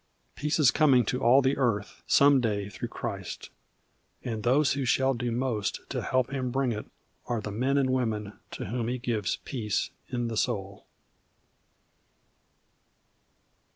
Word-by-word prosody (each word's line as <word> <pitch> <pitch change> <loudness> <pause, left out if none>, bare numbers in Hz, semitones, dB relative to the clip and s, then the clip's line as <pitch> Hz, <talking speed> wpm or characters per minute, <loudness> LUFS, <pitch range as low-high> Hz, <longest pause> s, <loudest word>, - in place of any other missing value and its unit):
Peace 150 +1 -1
is 145 -5 +5
coming 135 -7 +4
to 125 +4 -2
all 130 +4 +5
the 135 +2 +2
earth 115 -6 -1
some 140 -1 +5
day 100 -3 -1
through 100 - -5
Christ. - - -6 0.7
And 110 -3 -3
those 135 +6 +3
who 140 0 -2
shall 130 +1 +2
do 120 0 -2
most 115 -4 -1
to - - -2
help 130 -1 0
Him 130 -2 -1
bring 135 0 0
it 105 -1 -5 0.4
are 120 -2 -1
the 105 -1 -5
men 130 +7 +1
and 130 -2 +2
women 110 -5 -2
to - - -6
whom 115 +3 -2
He 125 +1 -1
gives 115 -5 -1
Peace 110 -7 -2 0.2
in 120 -1 -2
the 115 -1 -3
Soul. 100 -2 -2
125 Hz, 155 wpm, -28 LUFS, 110-135 Hz, 0.7 s, is